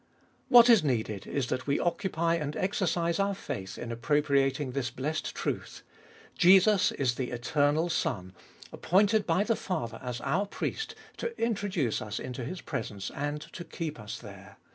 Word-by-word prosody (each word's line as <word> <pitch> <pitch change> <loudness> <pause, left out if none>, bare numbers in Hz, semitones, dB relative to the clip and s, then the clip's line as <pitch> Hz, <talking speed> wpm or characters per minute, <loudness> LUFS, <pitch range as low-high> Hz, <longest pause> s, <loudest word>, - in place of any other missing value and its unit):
2. - - +1
What 240 0 +10
is 230 -7 +7
needed 110 -7 -1
Is 140 -3 -1
that 130 - -2
we 140 - +2
occupy 170 -1 0
and 150 -3 -2
exercise 175 -3 0
our 200 0 +1
faith 95 - -6
In 120 - -5
appropriating 135 +2 +1
this 125 -2 -2
blessed 145 +6 -3
truth: - - -4 0.5
Jesus 190 +2 +6
is 130 -3 +1
the 125 0 -3
eternal 145 +6 +1
Son, 105 - -2 0.4
appointed 205 +4 +2
by 175 +4 +3
the 230 +1 +1
Father 120 - -4
as 125 -2 -4
our 180 +9 0
Priest 445 - -4 0.2
to 470 -1 -4
introduce 195 - 0
us 105 -1 -4
Into 125 0 -5
His 180 +9 -5
presence, 105 -8 -4
and 145 +1 -3
to 170 - -6
keep 160 -5 -5
us 105 -1 -6
there. - - -12
150 Hz, 165 wpm, -29 LUFS, 125-185 Hz, 0.5 s, What